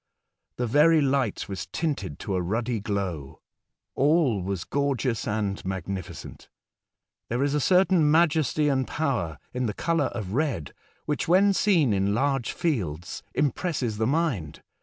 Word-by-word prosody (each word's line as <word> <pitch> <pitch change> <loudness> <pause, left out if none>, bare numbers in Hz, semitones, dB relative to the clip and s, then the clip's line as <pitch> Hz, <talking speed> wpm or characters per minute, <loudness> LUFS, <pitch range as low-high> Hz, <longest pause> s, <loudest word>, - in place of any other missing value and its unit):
The 125 - -1
very 150 +7 +5
light 135 -6 0
was 95 -3 -5
tinted 135 - -3
to 100 - -3
a 90 - 0
ruddy 115 +6 -1
glow. 95 -9 -4 0.5
All 140 - +2
was 95 -1 -3
gorgeous 135 -4 -1
and 105 -3 -2
magnificent. 95 -1 -6 0.8
There 120 +3 0
is 140 0 0
a 150 - +2
certain 180 -2 +4
majesty 155 -2 +3
and 130 -3 +1
power 120 - -1 0.2
in 125 -1 -1
the 105 - -3
colour 165 -4 +1
of 110 -7 -4
red 135 - -1 0.3
which, 150 +2 -2
when 195 +4 +5
seen 170 - +3
in 100 +1 +1
large 135 -1 0
fields, 90 - -2
impresses 135 -6 -1
the 110 - +2
mind. 135 - -1
125 Hz, 140 wpm, -26 LUFS, 100-150 Hz, 0.8 s, very